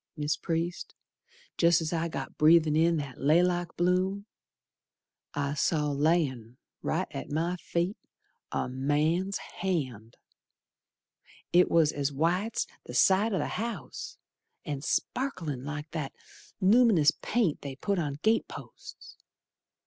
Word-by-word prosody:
Mis' 150 +1 0
Priest, 170 +2 -3 0.6
jest's 170 -1 +3
I 165 0 0
got 165 - -6
breathin' 155 0 +5
in 165 +1 +3
that 140 -3 -6
laylock 175 +4 +2
bloom 185 +3 +1 1.1
I 145 0 -1
saw, 150 0 +1
layin' 140 -6 0 0.2
right - - -1
at - - -6
my 165 +4 -1
feet, 175 +3 -2 0.5
A - - -1
man's 150 +9 0 0.2
hand! 130 - -3 1.4
It 180 +1 +5
was 160 -3 +4
as 140 0 -1
white's 175 +10 0 0.2
the - - -8
side 200 +4 +4
o' 195 - 0
th' - - -2
house, 215 - -5 0.5
And 145 -2 -4
sparklin' 165 - -2
like 150 +1 -6
that 155 -4 -4 0.5
lum'nous 200 -6 +5
paint 210 -10 0
they 140 -2 -6
put 200 +7 -1
on 145 -4 -2
gate 225 +1 +3
posts. - - -11
165 Hz, 120 wpm, -29 LUFS, 145-180 Hz, 1.4 s, breathin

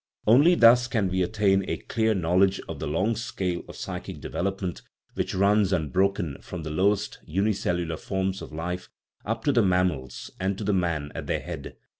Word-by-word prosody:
Only 145 +11 +6
thus 120 -2 +6
can 110 -7 0
we 95 +1 0
attain 95 0 +2
a - - -1
clear 110 -1 0
knowl 90 +1 +3
edge 95 0 +2
of 80 -3 -6
the 80 - -3
long 100 +10 +1
scale 105 -7 -3
of - - -9
psychic - - -6
development 95 -2 -3 0.3
which - - -2
runs 100 +1 +3
unbroken 90 -2 0
from 90 -3 -7
the 80 - -5
lowest, 100 +5 +1
unicellular 90 -3 -1
forms 95 +1 -2
of - - -8
life 85 +3 -4 0.4
up 110 +1 -2
to 145 - +3
the 125 -3 +4
mammals, 90 - 0
and 95 +1 -1
to 105 -1 -1
man 85 -6 -1
at - - -6
their - - -1
head. - - -7
95 Hz, 180 wpm, -26 LUFS, 85-105 Hz, 0.4 s, Only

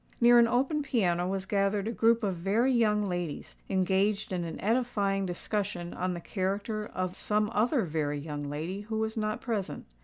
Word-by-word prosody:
Near 240 0 +7
an 235 - +6
open 270 +6 +1
piano 180 -10 +1
was 190 0 -2
gathered 200 +1 +1
a - - 0
group 230 0 +3
of 195 -3 0
very 210 +9 +2
young 210 -3 +3
ladies, 175 -4 -4
engaged 195 +2 +1
in 175 -1 -1
an 165 - -6
edifying 205 -4 +1
discussion 180 -1 -3
on 180 0 -2
the - - -5
character 200 +4 -2
of 185 -1 -2
some 210 +1 0
other 240 +3 +2
very 150 -2 -1
young 145 -1 -5
lady 165 +7 -4
who 220 +1 -4
was 220 0 -1
not 215 +1 -2
present. 220 -6 -3
200 Hz, 180 wpm, -29 LUFS, 180-225 Hz, -, Near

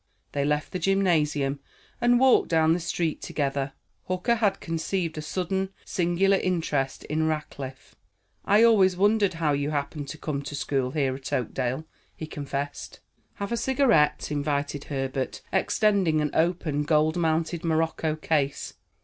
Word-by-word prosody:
They 140 - -1
left 150 +2 0
the 185 - -3
gymnasium, 155 -7 +1 0.4
and 240 0 +4
walked 260 -1 +5
down 160 -1 +4
the 175 - 0
street 170 -1 -2
together. 140 -1 -2 0.3
Hooker 185 +5 +1
had 205 -3 +1
conceived 165 +1 -2
a 155 - -4
sudden, 190 +4 -2 0.2
singular 180 +3 +2
interest 160 -8 -1
in 155 +1 -1
Rackliff. 140 -4 -5 0.5
"I 210 +3 +5
always 195 -6 +5
wondered 205 -1 +3
how 160 -3 +1
you 140 +1 -1
happened 145 0 -3
to 155 - -7
come 150 -3 -3
to 145 - -6
school 135 -2 -1
here 135 -1 0
at 130 0 -7
Oakdale," 130 +4 -2 0.3
he 155 - -6
confessed. 145 -1 -5 0.4
"Have 200 +1 -5
a - - +1
cigarette," 240 - +2
invited 145 -1 -2
Herbert, 135 -1 -3
extending 190 -4 +2
an 150 -1 0
open, 160 -3 +1
gold 155 +1 +2
mounted 165 0 0
morocco 160 -1 0
case. 150 -3 -1
155 Hz, 145 wpm, -26 LUFS, 145-185 Hz, 0.5 s, walked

